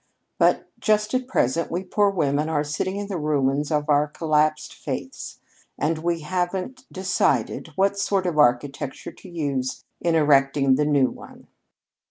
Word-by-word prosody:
But - - +3
just 215 0 +1
at 255 0 0
present 165 - 0
we 175 +3 -2
poor 205 +2 +2
women 150 -5 0
are 150 -2 +1
sitting 155 +6 -2
in 205 0 -3
the 195 -4 -4
ruins 145 -1 0
of 150 -2 0
our 150 0 +3
collapsed 155 0 0
faiths, - - -6 0.4
and 155 +2 0
we 170 0 -1
haven't 185 - -3
decided 185 - 0
what 200 +1 +1
sort 195 -1 0
of 165 -4 -1
architecture 140 +1 +1
to 185 - -14
use 140 -6 -3
in 170 -1 +1
erecting 140 -2 +4
the 150 +3 +2
new 140 -4 +3
one." - - -13
155 Hz, 155 wpm, -24 LUFS, 145-185 Hz, 0.4 s, erecting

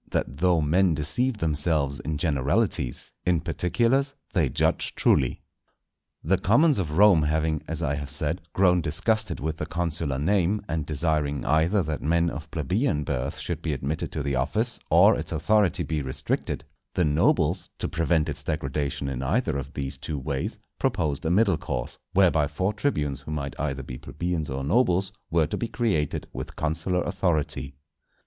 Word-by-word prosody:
—That 65 - -2
though 90 0 +3
Men 85 +3 +3
deceive 90 - -1
themselves 75 -4 0
in 75 -1 -3
Generalities, 70 - 0
in 90 -2 +2
Particulars 115 - +1 0.2
they 80 -9 +2
judge - - 0
truly. 65 - +2 0.8
The 90 +4 +2
commons 140 - +4
of 80 -4 -2
Rome 100 -5 +7
having, 80 +1 0
as 80 +1 -3
I 75 -3 +1
have 70 0 -5
said, 75 +4 -1
grown 90 -2 +4
disgusted 95 +8 0
with 80 +2 -3
the 75 - -4
consular 80 -5 -2
name, 95 +5 +1
and 80 -3 -2
desiring 75 -2 0
either 85 +6 +3
that 75 -1 -3
men 85 +2 +2
of 75 +2 -7
plebeian 80 - 0
birth 65 0 -2
should 85 -2 -4
be 80 -2 -1
admitted 70 +3 -3
to 75 - -2
the 70 -1 -1
office 110 - -1
or - - +6
its - - -4
authority 90 +4 +2
be 80 -2 -2
restricted, 65 -1 -2 0.3
the 90 - +3
nobles, 80 +3 +2
to - - -2
prevent 80 -1 +1
its 75 -1 -4
degradation 70 -2 -2
in 65 -2 -3
either 80 - 0
of 70 0 -4
these 70 -1 -4
two 75 +1 -4
ways, 70 0 -3 0.2
proposed 75 0 0
a - - +2
middle 95 -1 +3
course, - - -4
whereby 85 -6 +4
four 95 +6 -1
tribunes, 75 - -1
who - - -8
might 70 -2 -3
either 70 -2 -2
be 65 -2 -7
plebeians 85 -1 -3
or 65 +1 -3
nobles, 95 - +2 0.2
were 85 -2 +3
to - - -3
be 115 - -2
created 90 - -1
with - - -6
consular 80 +4 -1
authority. 75 -7 -1
80 Hz, 170 wpm, -26 LUFS, 70-90 Hz, 0.8 s, Rome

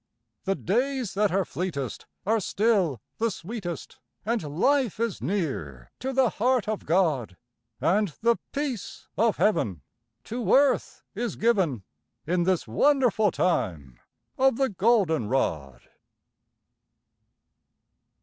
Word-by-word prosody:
The 195 0 +1
days 245 +2 -1
that 205 0 +2
are 190 0 +1
fleetest 155 -10 -4 0.2
are 220 +3 +2
still 195 - +1 0.2
the 230 +1 +2
sweetest, 180 - -6 0.3
And 230 +1 0 0.2
life 265 -2 +2
is 230 -4 -1
near 85 - -3
to 265 +2 -2
the 260 -3 +3
heart 250 0 +1
of 215 -1 -3
God, 150 - +1 0.4
And 205 +4 +2 0.2
the 235 0 +4
peace 275 -8 -4
of 230 -1 +2
heaven 100 - +1 0.4
to 235 - +1
earth 275 -1 +2
is 235 +3 -3
given 190 - +1 0.4
In 175 +1 +1
this 185 -7 +1
wonderful 235 - +3
time 80 - -1 0.4
of 265 -2 +4
the 270 -1 +2
golden 190 - +2
rod. 75 - -1
200 Hz, 115 wpm, -26 LUFS, 160-235 Hz, 0.4 s, the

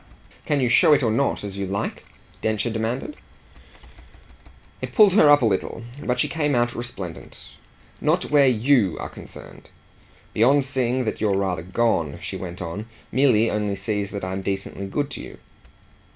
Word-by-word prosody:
"Can 145 -2 +2
you 130 - +2
show 120 +5 +5
it 145 - +3
or 115 - +2
not 120 +1 0
as 100 -1 -6
you 100 - -2
like?" 100 +1 -3 0.4
Densher 110 +2 -1
demanded. 115 - -3 1.6
It - - -6
pulled 210 -5 +7
her 155 -7 +6
up 145 -2 +6
a - - +5
little, 110 +2 -1 0.2
but 125 0 -1
she - - +2
came 150 -4 0
out 120 0 +1
resplendent. 100 -8 -7 0.6
"Not - - +1
where 145 -2 +6
YOU 120 - +3
are - - -5
concerned. - - -12 0.6
Beyond 135 +5 +4
seeing 130 -1 0
that 110 - -3
you're 100 -3 +2
rather 95 -4 -1
gone," 90 -5 0
she - - -6
went 90 0 -6
on, 100 +6 -6 0.2
"Milly 120 -4 +3
only 105 -1 -1
sees 105 0 -2
that 100 -2 -6
I'm 95 +1 -3
decently 95 0 -4
good 145 +8 -2
to - - -7
you." - - -10
110 Hz, 165 wpm, -23 LUFS, 100-130 Hz, 1.6 s, pulled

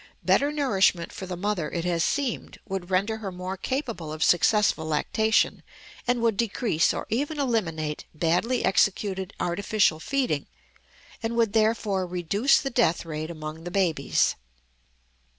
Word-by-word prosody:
Better 285 +1 +3
nourishment 200 - +2
for 190 - -7
the 180 -1 -5
mother, 190 -4 -1
it 170 0 -3
has 170 -2 +1
seemed, 275 - -2
would 190 -3 -4
render 200 +4 +1
her 205 -3 -5
more 180 +1 -5
capable 230 - -3
of 155 +1 -2
successful 195 -1 +3
lactation, 220 +8 +1 0.5
and 245 -1 +1
would 225 -3 +2
decrease 215 -6 +1
or - - -4
even 290 +6 -1
eliminate 165 - -1
badly 175 +11 +1
executed 190 -1 +1
artificial 185 -1 +1
feeding, 250 - -1 0.7
and 230 +1 -2
would 230 -3 +2
therefore 215 -4 +1
reduce 180 - +2
the 270 - -3
death 235 -9 +2
rate 155 0 -4
among 155 -1 -7
the 175 - -5
babies. 175 -7 +1
195 Hz, 140 wpm, -26 LUFS, 170-230 Hz, 0.7 s, Better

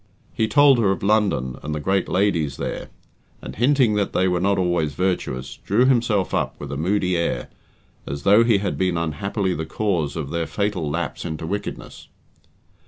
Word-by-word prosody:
He 110 - 0
told 140 +3 +5
her 105 -4 +3
of 95 - -1
London 100 - +1
and 75 0 -4
the - - -3
great 95 +5 0
ladies 85 -8 +1
there, - - -5 0.5
and - - -9
hinting 125 -1 +3
that 105 -1 -1
they 95 - +2
were 90 -1 +1
not 100 +2 +1
always 85 -5 0
virtuous, 90 -8 -2
drew 110 +6 +1
himself 115 -7 +2
up - - -1
with 70 -2 -7
a - - -3
moody 90 +4 0
air, 85 0 -1 0.6
as 70 +1 -5
though 105 +4 +6
he 115 -3 +3
had 100 0 -3
been 90 -2 +1
unhappily 95 +5 -1
the 80 -1 -4
cause 85 -5 -1
of 75 -4 -4
their 85 -1 -2
fatal 100 -7 -2
lapse 75 - -3
into 80 +1 -5
wickedness. 100 +4 -6
95 Hz, 180 wpm, -22 LUFS, 80-105 Hz, 0.6 s, though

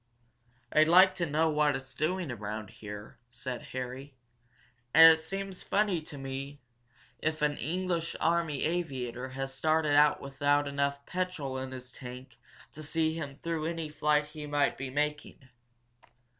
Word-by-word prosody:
"I'd 155 0 +6
like 185 +2 +7
to 170 - 0
know 160 +2 +2
what 150 -2 +2
it's 135 0 -7
doing 165 +2 -1
around 105 -2 -5
here," 105 0 -9
said 120 +1 -5
Harry. 130 +2 -6 0.8
"And 160 +1 +11
it 160 - -2
seems 195 +3 -5
funny 200 -5 +1
to 150 -2 -10
me 135 +1 -5 0.6
if 155 -1 -1
an 150 0 +2
English 170 0 -2
army 165 -4 +1
aviator 130 -7 -2
has 135 +1 -4
started 155 +1 +2
out 150 0 +5
without 145 +1 +1
enough 140 0 -1
petrol 170 -8 -3
in 130 0 -5
his 130 -1 -8
tank 125 +1 -10 0.3
to 155 - -9
see 160 +1 0
him 145 -4 -5
through 165 -2 -1
any 165 -2 -3
flight 150 0 +2
he 150 0 -8
might 145 -1 +1
be 135 -1 -5
making. 145 -1 -3
145 Hz, 150 wpm, -30 LUFS, 135-160 Hz, 0.8 s, And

